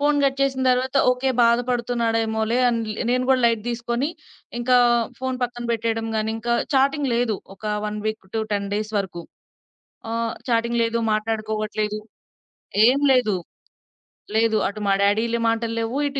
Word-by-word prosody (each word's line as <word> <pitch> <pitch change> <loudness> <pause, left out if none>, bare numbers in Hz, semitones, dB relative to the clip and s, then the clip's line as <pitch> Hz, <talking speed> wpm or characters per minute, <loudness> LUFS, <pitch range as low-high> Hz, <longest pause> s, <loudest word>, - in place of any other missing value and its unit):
Phone 290 0 +2
cut 270 -1 +1
చేసిన 270 -1 +1
తర్వాత 255 +2 0
okay. 250 +1 0
బాధపడుతున్నాడేమోలే 235 -1 +1
అని, 235 -1 0 0.3
నేను 250 +1 +1
గూడా 260 -1 +4
లైట్ 230 -2 +1
దీసుకొని 235 +3 -1 0.5
ఇంకా 250 +1 +3 0.4
ఫోను 260 -1 -3
పక్కన 240 0 -3
బెట్టేయడం 225 0 -1
గానీ, 215 0 0
ఇంకా 235 +1 0 0.2
చాటింగ్ 275 +1 +2
లేదు. 235 -3 +1 0.2
ఒక 200 - -17 0.2
1 210 0 -4
వీక్ 215 -2 -3
టు - - +1
10 200 -1 -1
డేస్ 215 +1 -3
వరుకు 185 -3 -4 0.9
ఆహ్, 230 0 -1 0.2
చాటింగ్ 235 0 +1
లేదు. 230 0 0 0.2
మాట్లాడుకోవట్లేదు. 215 -1 -2 0.9
ఏం 260 +3 +4
లేదు. 245 -6 +3 1.0
లేదు. 220 0 +3
అటు 210 +2 -6
మా 195 - +4
డ్యాడీ 205 +2 +3
లీ 235 - +1
మాటల్లేవు. 230 +1 -2
ఇటు 275 0 -4
230 Hz, 145 wpm, -23 LUFS, 220-250 Hz, 1.0 s, గూడా